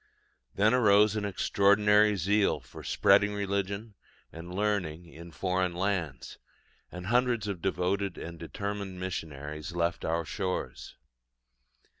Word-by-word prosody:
Then 105 Hz, +4 st, +3 dB
arose 105 Hz, -3 st, +5 dB
an 105 Hz, -1 st, -2 dB
extraordinary 105 Hz, +1 st, +3 dB
zeal 100 Hz, -1 st, +2 dB
for -, -, -12 dB
spreading 100 Hz, +1 st, +3 dB
religion 100 Hz, +2 st, -2 dB, 0.4 s
and 85 Hz, +2 st, -9 dB
learning 90 Hz, -5 st, -1 dB
in 85 Hz, +1 st, -12 dB
foreign 90 Hz, +3 st, -1 dB
lands; 85 Hz, -8 st, -3 dB, 0.5 s
and 90 Hz, 0 st, -8 dB
hundreds 120 Hz, -1 st, +1 dB
of 95 Hz, -4 st, -4 dB
devoted 95 Hz, +1 st, -1 dB
and 85 Hz, 0 st, -8 dB
determined 100 Hz, +2 st, -5 dB
missionaries 75 Hz, -3 st, -5 dB
left 85 Hz, 0 st, -1 dB
our 85 Hz, +1 st, -1 dB
shores. 95 Hz, +3 st, -4 dB
95 Hz, 115 wpm, -29 LUFS, 85-105 Hz, 0.5 s, arose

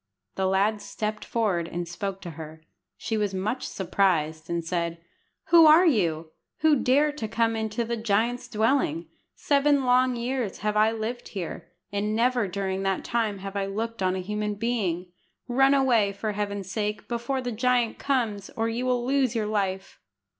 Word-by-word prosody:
The 190 Hz, 0 st, 0 dB
lad 200 Hz, +3 st, +1 dB
stepped 215 Hz, 0 st, -4 dB
forward 195 Hz, -8 st, 0 dB
and 175 Hz, 0 st, -4 dB
spoke 195 Hz, +3 st, -5 dB
to 175 Hz, -, -7 dB
her. 160 Hz, 0 st, -10 dB, 0.3 s
She 220 Hz, -, -2 dB
was 205 Hz, -2 st, -1 dB
much 215 Hz, +7 st, -2 dB
surprised, 165 Hz, -5 st, 0 dB
and 170 Hz, -1 st, -2 dB
said 170 Hz, -1 st, -2 dB, 0.5 s
"Who 335 Hz, -2 st, +8 dB
are 320 Hz, +4 st, +7 dB
you, 165 Hz, -, +1 dB, 0.3 s
who 315 Hz, -1 st, +5 dB
dare 285 Hz, +5 st, +3 dB
to 290 Hz, -7 st, -5 dB
come 230 Hz, +1 st, +1 dB
into 220 Hz, +1 st, -2 dB
the 235 Hz, +1 st, -2 dB
giant's 225 Hz, +3 st, 0 dB
dwelling? 215 Hz, -, 0 dB, 0.3 s
Seven 285 Hz, -1 st, +2 dB
long 250 Hz, 0 st, +3 dB
years 240 Hz, -4 st, -3 dB
have 210 Hz, 0 st, +1 dB
I 215 Hz, +1 st, +4 dB
lived 225 Hz, +2 st, -4 dB
here, 185 Hz, -5 st, -6 dB, 0.2 s
and 205 Hz, +1 st, -1 dB
never 240 Hz, -1 st, +2 dB
during 190 Hz, 0 st, -2 dB
that 195 Hz, -1 st, -1 dB
time 225 Hz, -4 st, -1 dB
have 195 Hz, 0 st, -6 dB
I 195 Hz, -1 st, -1 dB
looked 225 Hz, +2 st, -4 dB
on 185 Hz, 0 st, +1 dB
a 185 Hz, -, -2 dB
human 210 Hz, +1 st, -2 dB
being. 195 Hz, -6 st, -2 dB, 0.4 s
Run 270 Hz, +3 st, +4 dB
away, 235 Hz, -7 st, +3 dB
for 215 Hz, +2 st, -3 dB
Heaven's 200 Hz, -2 st, -4 dB
sake, 210 Hz, 0 st, -3 dB
before 240 Hz, +3 st, -2 dB
the 245 Hz, -1 st, -3 dB
giant 240 Hz, 0 st, +1 dB
comes, 225 Hz, -8 st, -1 dB
or 225 Hz, 0 st, +1 dB
you 235 Hz, +3 st, -2 dB
will 245 Hz, -1 st, +1 dB
lose 265 Hz, -3 st, +1 dB
your 220 Hz, -2 st, 0 dB
life." 195 Hz, -2 st, -2 dB
215 Hz, 175 wpm, -26 LUFS, 195-245 Hz, 0.5 s, Who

